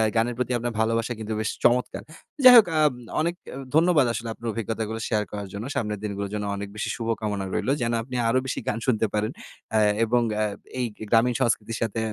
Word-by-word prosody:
গানের 115 +1 +1
প্রতি 125 0 -1
আপনার 120 0 -3
ভালোবাসা 115 +2 +1
কিন্তু 110 0 -4
বেশ 110 - -1
চমৎকার! 125 +1 +2 0.4
যাই 255 -1 +11
হোক 215 - +7
আব 150 -2 +5 0.3
অনেক 170 +2 0 0.2
আ - - -6 0.2
ধন্যবাদ 160 -4 +5
আসলে 115 +1 -4
আপনার 115 - -8
অভিজ্ঞতাগুলো 110 0 -3
শেয়ার 105 -2 +1
করার 100 -1 -5
জন্য। 105 +4 -5
সামনের 105 -2 -2
দিনগুলোর 100 -1 -4
জন্য 105 -1 -2
অনেক 100 0 -5
বেশি 105 - -3
শুভকামনা 110 -4 -2
রইলো, 135 - 0
যেন 115 0 0
আপনি 125 +1 -8
আরো 130 +3 +3
বেশি 130 - -2
গান 110 - 0
শুনতে 115 -4 +2
পারেন, 105 +2 0 0.4
আ - - +5 0.3
এবং 120 +2 +2 0.2
আ - - +3 0.4
এই 125 - +1 0.2
গ্রামীণ 120 +1 +3
সংস্কৃতির 110 0 0
সাথে 115 0 -1
115 Hz, 200 wpm, -25 LUFS, 105-125 Hz, 0.4 s, যাই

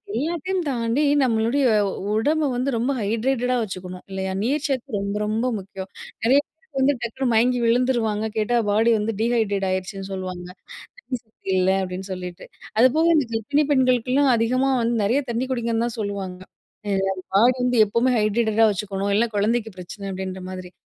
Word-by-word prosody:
எல்லாத்தையும் 345 +4 -1
தாண்டி 240 +2 0 0.2
நம்மளுடைய 235 +3 +2 0.5
உடம்பு 300 +7 +1
வந்து 255 +3 0
ரொம்ப 245 +5 0
ஹைட்ரேட்டடா 250 +4 0
வச்சுக்கணும் 185 -2 -7
இல்லயா! 190 0 -3
நீர்ச்சத்து 270 -3 -1
ரொம்ப, 200 +1 -3
ரொம்ப 220 +3 -1
முக்கியம். 190 0 -8 0.3
நிறைய 265 +5 +5
பேர் 320 -3 -15
வந்து 280 +2 +4
டக்குனு 250 +3 -2
மயங்கி 245 +2 +3
விழுந்துருவாங்க. 230 -3 +1
கேட்டா 235 +3 +1
பாடி 225 +3 +3
வந்து 220 +2 -1
டீஹைட்ரேட் 215 -5 +1
ஆகிருச்சுன்னு 190 +1 -3
சொல்லுவாங்க. 185 -1 -5 0.5
தண்ணீ 265 - -4
சத்து 220 -3 -16
இல்ல 185 +1 +3
அப்பிடின்னு 185 +1 -5
சொல்லிட்டு. 180 -1 -7 0.4
அதுபோக 315 +7 +5
இந்த 285 -5 +2
கர்ப்பிணி 285 +7 +1
பெண்களுக்குலாம் 260 +1 +3
அதிகமா 255 +4 +1
வந்து 230 0 +1
நிறைய 245 +8 +2
தண்ணி 240 +3 -1
குடிங்கன்னு 235 -1 0
தான் 240 - -5
சொல்லுவாங்க. 195 -3 -4 0.5
அ - - +1 0.4
பாடி 245 +4 +5
வந்து 250 -1 +1
எப்பவுமே 235 +5 +1
ஹைட்ரேட்டடா 220 +1 +3
வச்சுக்கணும். 200 0 -2
இல்ல 235 +2 +3
குழந்தைக்கு 220 +2 0
பிரச்சனை 190 +3 -8
அப்பிடின்றமாதிரி. 185 -1 -6
230 Hz, 145 wpm, -23 LUFS, 200-255 Hz, 0.5 s, நிறைய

